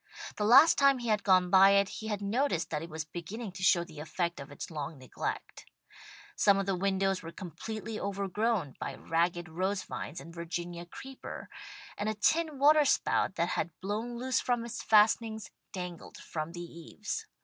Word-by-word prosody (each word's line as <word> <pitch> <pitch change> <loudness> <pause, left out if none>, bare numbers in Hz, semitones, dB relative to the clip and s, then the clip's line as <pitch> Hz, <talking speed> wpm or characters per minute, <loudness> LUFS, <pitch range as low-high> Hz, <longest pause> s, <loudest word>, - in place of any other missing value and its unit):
The 210 - 0
last 270 +9 +7
time 275 -1 +5
he 240 -2 -4
had 210 -2 +2
gone 185 -2 +4
by 195 +1 +8
it, 200 0 +4
he 220 - -7
had 205 -2 -2
noticed 210 - 0
that 150 -2 -1
it 165 - -7
was 160 0 -5
beginning 190 +7 -6
to 190 +1 -9
show 180 -2 +4
the 160 -4 -12
effect 170 +2 -2
of 140 +1 -9
its 145 - -7
long 150 0 -5
neglect. 130 -2 -5 0.7
Some 200 -1 +4
of 195 - 0
the 195 -1 0
windows 195 0 0
were 165 - -8
completely 215 +5 -6
overgrown 200 - -1
by - - -4
ragged 175 +1 0
rose 185 +4 -1
vines 150 - -6
and 165 - -11
Virginia 170 0 -5
Creeper, 265 +8 -9 0.5
and 210 +1 0
a 215 - -2
tin 315 +7 +1
waterspout 290 -8 +4
that 170 +1 0
had 170 -2 -3
blown 220 +5 -3
loose 255 0 0
from 240 -2 0
its 235 - -5
fastenings, 220 0 +3 0.2
dangled 180 -2 -7
from 155 +1 -5
the 175 - -6
eaves. 190 - -6
195 Hz, 180 wpm, -31 LUFS, 170-220 Hz, 0.7 s, by